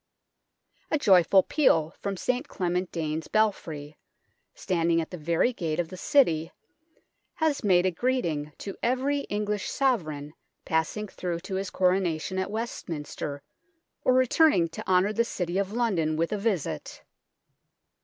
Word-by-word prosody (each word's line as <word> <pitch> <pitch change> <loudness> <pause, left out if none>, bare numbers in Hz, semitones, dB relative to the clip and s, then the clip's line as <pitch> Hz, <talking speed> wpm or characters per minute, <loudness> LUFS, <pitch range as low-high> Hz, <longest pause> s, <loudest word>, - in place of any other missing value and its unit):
A 305 - +2
joyful 190 - +5
peal 165 - +2
from 200 -1 -3
St 255 - -1
Clement 180 0 -2
Danes 160 -1 -3
belfry, 160 -9 -1 0.6
standing 170 -2 +1
at 160 - -4
the 180 - -5
very 170 +10 +1
gate 165 -6 -2
of 170 -2 -1
the 185 - -8
City, 170 - +2 0.8
has 315 -7 0
made 185 -3 +4
a 185 - +2
greeting 170 - -1
to 195 - -6
every 260 +4 +1
English 210 -1 -2
Sovereign 155 - -1 0.3
passing 160 +7 -1
through 175 -3 -4
to 190 - -7
his 190 0 -2
Coronation 185 -1 0
at 190 - -2
Westminster 160 -9 -5 0.6
or 255 - +4
returning 255 - +4
to 165 - -8
honour 185 +3 +3
the 235 - +2
City 180 -5 -2
of 200 0 -1
London 195 -10 0
with 165 +1 0
a 210 - 0
visit. 195 - -2
185 Hz, 140 wpm, -27 LUFS, 165-220 Hz, 0.8 s, joyful